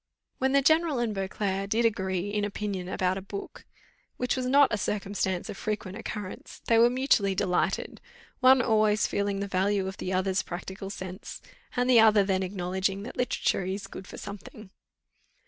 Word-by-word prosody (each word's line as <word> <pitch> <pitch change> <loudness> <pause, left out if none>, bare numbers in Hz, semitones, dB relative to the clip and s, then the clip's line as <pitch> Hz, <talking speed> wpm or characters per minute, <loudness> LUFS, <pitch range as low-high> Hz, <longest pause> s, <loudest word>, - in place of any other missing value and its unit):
When 265 +1 +1
the 280 0 +4
general 315 -1 +3
and 235 -3 0
Beauclerc 195 0 -2
did 230 +2 +2
agree 190 -3 0
in 210 0 -1
opinion 200 -3 -3
about 185 0 0
a - - -9
book, 200 +1 -8 0.5
which 250 0 0
was 255 -1 -2
not 280 0 +5
a - - +2
circumstance 195 -3 -2
of - - -7
frequent 210 -3 -4
occurrence, 205 -3 -7
they 230 -1 +4
were 235 +1 +7
mutually 240 -6 +2
delighted; 180 -1 -1 0.4
one 260 -1 +6
always 215 -2 +3
feeling 200 -1 -1
the 200 - -2
value 195 +1 +1
of 190 - -6
the 185 - -4
other's 190 +1 +1
practical 190 +2 -7
sense, 185 -1 -7 0.4
and 245 0 +1
the 250 -2 +6
other 215 -2 +6
then 190 -1 0
acknowledging 190 +1 -2
that 230 - -8
literature 250 -5 0
is 190 +2 -4
good 190 - -9
for - - -10
something. 200 0 -9
200 Hz, 175 wpm, -28 LUFS, 190-225 Hz, 0.5 s, were